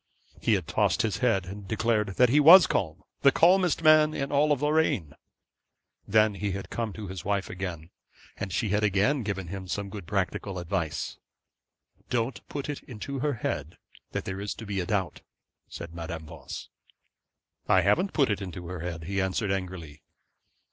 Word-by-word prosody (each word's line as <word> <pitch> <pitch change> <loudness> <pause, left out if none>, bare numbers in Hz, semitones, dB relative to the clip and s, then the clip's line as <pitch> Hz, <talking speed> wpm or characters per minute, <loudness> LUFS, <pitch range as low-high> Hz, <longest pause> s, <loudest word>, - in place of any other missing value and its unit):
He - - +3
had - - -2
tossed - - +1
his 110 -5 -1
head 110 -8 +1
and 100 +2 -8
declared 110 -2 0
that 125 -1 +5
he 145 +5 +4
was 170 +6 +10
calm; 80 -5 -2 0.2
the 140 - +6
calmest 175 +1 +4
man 155 0 +6
in 140 0 -3
all 145 +1 +3
Lorraine. 145 - +1 0.9
Then 110 +1 +4
he 100 0 -3
had 95 0 -6
come 115 -2 -2
to 110 - -7
his 95 -2 -6
wife 100 -1 -1
again, 90 -4 -6 0.4
and 100 -2 -5
she 105 +4 0
had 105 +2 +1
again 105 +8 +2
given 95 -5 -4
him 95 0 -6
some 100 +1 -4
good 100 -6 -8
practical 95 0 -2
advice. 85 -4 -3 0.9
'Don't 120 +1 -1
put 140 -2 -4
it 145 -1 -4
into 130 +3 -6
her 145 +2 0
head 75 - -4 0.3
that - - -3
there 95 +1 -4
is 100 - -4
to 115 - -9
be 100 -1 -2
a 90 - -3
doubt,' 95 -5 -1 0.5
said 85 -1 -8
Madame 85 -1 -6
Voss. 80 -1 -9 1.0
'I 95 - +5
haven't 105 - +2
put 135 -7 +3
it 105 - -2
into 90 -2 -7
her 90 -1 -5
head,' 85 -1 -5
he 95 +3 -1
answered 95 +2 -1
angrily. 90 -6 -5
100 Hz, 175 wpm, -27 LUFS, 90-125 Hz, 1.0 s, was